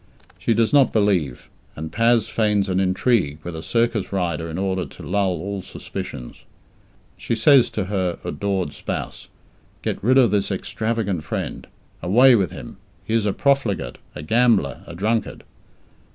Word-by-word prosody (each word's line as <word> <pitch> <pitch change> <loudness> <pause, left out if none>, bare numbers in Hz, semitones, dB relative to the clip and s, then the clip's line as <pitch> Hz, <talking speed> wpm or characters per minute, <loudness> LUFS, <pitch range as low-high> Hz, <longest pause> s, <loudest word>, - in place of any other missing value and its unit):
She 115 - +1
does 115 +2 +2
not 140 -3 +5
believe, 95 - 0 0.3
and 80 +1 -6
Paz 115 +2 +3
feigns 105 -3 +1
an 95 0 +1
intrigue 95 - +1
with 85 -1 -6
a 80 - -5
circus 115 0 0
rider 85 -4 -2
in 80 - -5
order 95 -1 -1
to - - -13
lull 95 +3 0
all 100 +3 -4
suspicions. 60 -8 -7 0.8
She 115 - -2
says 125 +2 +5
to 105 - -2
her 95 -3 -1
adored 95 -6 -2
spouse, - - -5 0.6
"Get - - -3
rid 130 +4 +4
of 120 -6 +5
this 100 -1 +1
extravagant 100 -3 -2
friend! - - -5 0.3
Away 125 +8 +6
with 100 -6 +2
him! - - -10 0.3
He 110 - -3
is 110 -2 +2
a - - +2
profligate, 125 - 0 0.2
a 75 - -7
gambler! 110 - +2
A 85 - -8
drunkard!" 110 +4 -1
100 Hz, 155 wpm, -22 LUFS, 90-115 Hz, 0.8 s, Away